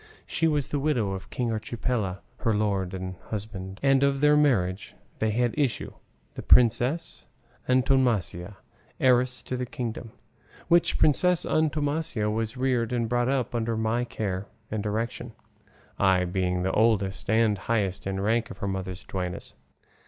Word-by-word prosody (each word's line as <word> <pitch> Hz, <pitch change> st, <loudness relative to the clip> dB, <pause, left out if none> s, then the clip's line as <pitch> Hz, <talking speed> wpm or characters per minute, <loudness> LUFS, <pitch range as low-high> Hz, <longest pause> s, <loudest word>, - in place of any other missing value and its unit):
She 165 Hz, -, 0 dB
was 150 Hz, -3 st, 0 dB
the 145 Hz, -, -1 dB
widow 130 Hz, -9 st, 0 dB
of 95 Hz, +1 st, -6 dB
King 120 Hz, -2 st, -2 dB
Archipiela, 110 Hz, -3 st, -2 dB, 0.2 s
her 115 Hz, -3 st, 0 dB
lord 100 Hz, -3 st, 0 dB
and 95 Hz, 0 st, -5 dB
husband, 100 Hz, -2 st, -5 dB
and 135 Hz, -1 st, +4 dB
of 140 Hz, 0 st, +2 dB
their 150 Hz, +1 st, +5 dB
marriage 105 Hz, -11 st, +1 dB, 0.2 s
they 110 Hz, -, +1 dB
had 120 Hz, +2 st, +1 dB
issue 140 Hz, -6 st, -1 dB, 0.4 s
the -, -, -6 dB
Princess 125 Hz, +6 st, +3 dB, 0.4 s
Antonomasia, 120 Hz, -8 st, +1 dB, 0.4 s
heiress 125 Hz, -2 st, +3 dB
of 125 Hz, -, -1 dB
the 125 Hz, -, -1 dB
kingdom; 120 Hz, -2 st, -5 dB, 0.6 s
which 170 Hz, 0 st, +4 dB
Princess 180 Hz, +4 st, +3 dB
Antonomasia 150 Hz, -7 st, 0 dB
was 115 Hz, +3 st, -2 dB
reared 125 Hz, -3 st, 0 dB
and 120 Hz, -2 st, -1 dB
brought 120 Hz, +1 st, +1 dB
up 135 Hz, -3 st, 0 dB
under 115 Hz, -1 st, -1 dB
my 110 Hz, +2 st, 0 dB
care 100 Hz, -5 st, -4 dB, 0.2 s
and 110 Hz, -1 st, -1 dB
direction, 110 Hz, +3 st, -3 dB, 0.7 s
I 95 Hz, -2 st, +3 dB
being 90 Hz, 0 st, -1 dB
the 95 Hz, -, 0 dB
oldest 105 Hz, -4 st, +1 dB
and 110 Hz, -1 st, +3 dB
highest 100 Hz, -5 st, -1 dB
in 95 Hz, 0 st, -2 dB
rank 115 Hz, +4 st, +1 dB
of -, -, -9 dB
her 100 Hz, -, -3 dB
mother's 95 Hz, -1 st, -4 dB
duennas. 90 Hz, -2 st, -5 dB
115 Hz, 150 wpm, -26 LUFS, 100-130 Hz, 0.7 s, their